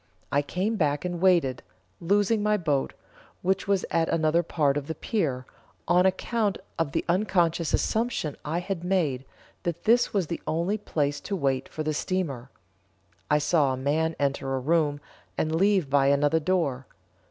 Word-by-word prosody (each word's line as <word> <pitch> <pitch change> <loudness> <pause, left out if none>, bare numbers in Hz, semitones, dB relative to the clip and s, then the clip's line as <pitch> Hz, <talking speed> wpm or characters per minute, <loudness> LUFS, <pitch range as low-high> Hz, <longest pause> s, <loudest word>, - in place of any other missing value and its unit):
I 145 - +3
came 190 +9 -2
back 145 -2 0
and 175 -1 -3
waited, 170 -10 +3 0.4
losing 205 +4 +2
my 210 0 +2
boat, 150 -7 -1 0.5
which 190 +1 0
was 200 -2 +1
at 165 -1 +1
another 165 +1 +2
part 150 -4 +1
of 145 -1 -3
the 160 - -4
pier, 145 - -2 0.4
on 180 +2 +4
account 205 +2 0 0.2
of 165 -4 0
the - - -1
unconscious 175 -3 +1
assumption 225 - 0
I 160 +4 -2
had 180 -2 -4
made, 160 -9 0 0.4
that 170 -1 -4
this 235 +2 +3
was 195 -4 +1
the 170 +2 -5
only 175 +7 0
place 145 -7 -1
to 200 - -3
wait 135 -6 -1
for 155 - -4
the 155 0 -1
steamer. 145 -8 -2 0.8
I 150 - +4
saw 150 -2 +2
a - - -3
man 155 +4 0
enter 135 -1 -1
a - - -1
room, 150 +1 +1 0.4
and 155 0 0
leave 190 -1 +3
by 135 0 +3
another 145 +3 +3
door. 150 -7 -1
165 Hz, 165 wpm, -26 LUFS, 145-185 Hz, 0.8 s, on